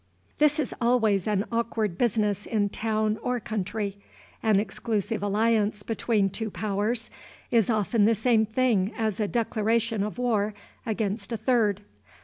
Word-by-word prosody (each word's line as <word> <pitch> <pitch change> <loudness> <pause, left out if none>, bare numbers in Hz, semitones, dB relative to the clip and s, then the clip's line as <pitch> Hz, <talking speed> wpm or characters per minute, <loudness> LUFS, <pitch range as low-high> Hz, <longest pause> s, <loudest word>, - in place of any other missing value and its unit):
This 300 0 +4
is 290 - -1
always 225 -5 +2
an 205 -1 +1
awkward 230 -4 -1
business 210 -2 0
in 205 -3 +1
town 215 0 -1
or 250 0 -1
country. 205 -2 -3 0.4
An 215 -3 +3
exclusive 215 0 -2
alliance 210 0 +1
between 220 -2 +1
two 220 +2 -3
powers 210 +4 -2 0.4
is 230 -3 +3
often 215 -1 +2
the 225 +1 +4
same 220 -1 +2
thing 220 -4 +1
as 220 -3 -1
a 210 - +1
declaration 225 0 0
of 210 +3 -3
war 215 -4 0 0.3
against 215 -1 -2
a 230 - -1
third. 220 -3 +1
220 Hz, 140 wpm, -26 LUFS, 205-230 Hz, 0.4 s, This